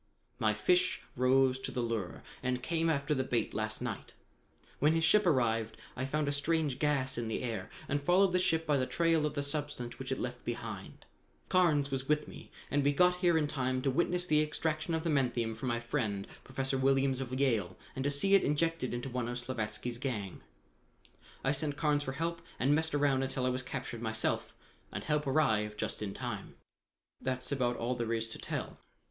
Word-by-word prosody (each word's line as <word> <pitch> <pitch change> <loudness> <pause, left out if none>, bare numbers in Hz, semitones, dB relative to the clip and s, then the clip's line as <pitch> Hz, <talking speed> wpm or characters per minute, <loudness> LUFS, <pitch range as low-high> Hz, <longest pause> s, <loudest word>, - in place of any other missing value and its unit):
"My 110 -1 +2
fish 180 +12 +2
rose 130 +1 +4
to - - -4
the 125 - -1
lure 115 -6 -3 0.2
and 125 0 -1
came 165 +2 +1
after 145 -1 +1
the 130 -2 +1
bait 120 -3 -1
last - - -2
night. - - -5 0.7
When 150 +3 +4
his 165 0 +1
ship 195 +4 +5
arrived, 115 -6 +2 0.2
I 130 - -2
found 150 +1 0
a - - +2
strange 145 -1 0
gas 130 -4 +1
in 115 - -2
the 110 - -2
air, 110 -6 -3 0.2
and 145 +1 0
followed 180 +5 +4
the 180 - +3
ship 165 -2 +1
by 150 -2 +3
the 130 -1 0
trail 165 -2 +2
of 150 - -6
the 140 - 0
substance 140 -4 -3
which - - -5
it - - 0
left - - -4
behind - - -5
it. - - -19 0.4
Carnes 155 -7 +3
was 135 0 -2
with 150 0 +2
me, - - -11 0.2
and 145 0 +2
we 145 +1 +3
got 180 +3 +4
here 175 -2 +3
in 155 - +2
time 130 -3 -1
to 135 - +2
witness 175 +5 +1
the 155 -3 +4
extraction 155 +2 -1
of 160 - -2
the 165 - +1
menthium 120 -5 +1
from 115 +4 -5
my 120 -1 +1
friend, 110 -5 -2 0.2
Professor 135 0 -1
Williams 135 0 +3
of 130 0 -3
Yale, 115 -10 +1 0.2
and 130 - -2
to 140 - +2
see 145 +8 +2
it 195 - +8
injected 150 -3 0
into 120 +2 -4
one 125 -2 -2
of 120 - -3
Slavatsky's 120 -1 -3
gang. 110 -8 -3 1.0
I 135 - +3
sent 145 0 0
Carnes 150 -2 +2
for 135 -2 -3
help 165 +4 -2 0.2
and 135 +3 +3
messed 160 0 +2
around 140 -2 +3
until 130 -1 -1
I - - +3
was 125 +1 0
captured 125 -2 -5
myself 110 -1 0 0.4
and - - -4
help 150 -1 0
arrived 110 -7 +2
just - - -3
in 100 -2 -4
time. - - -5 0.7
That's 130 0 -2
about 125 -3 +1
all 120 +2 -1
there 115 -2 -1
is 115 0 -1
to - - -8
tell. - - -4
135 Hz, 205 wpm, -32 LUFS, 120-150 Hz, 1.0 s, it